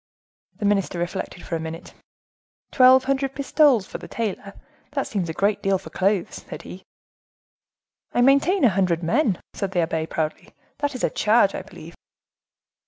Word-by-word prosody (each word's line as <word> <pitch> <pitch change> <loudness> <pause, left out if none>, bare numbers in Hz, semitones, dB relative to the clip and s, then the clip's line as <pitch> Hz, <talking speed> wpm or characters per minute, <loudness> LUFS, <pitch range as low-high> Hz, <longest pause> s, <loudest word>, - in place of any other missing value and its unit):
The 210 - -3
minister 200 -3 +1
reflected 175 +1 -4
for 170 - -3
a - - -2
minute. 160 +1 -7 0.8
"Twelve 260 0 +6
hundred 270 0 -1
pistoles 280 -6 +3
to - - -6
the - - -10
tailor; 200 -3 -4 0.4
that 275 -2 -1
seems 185 -6 -3
a - - -1
great 205 +4 0
deal 195 -1 +2
for 185 - -12
clothes," 195 -1 -1
said - - -7
he. 185 - -10 1.3
"I 245 - +1
maintain 280 +9 +4
a 250 - +7
hundred 180 -3 0
men," 215 - +1
said 195 -1 -4
the 175 - +2
abbe, 160 -1 -1
proudly; 155 -1 -4 0.2
"that 290 -2 -2
is 255 - -5
a - - +1
charge, 210 -2 +3
I - - -4
believe." - - -12
200 Hz, 170 wpm, -23 LUFS, 180-260 Hz, 1.3 s, a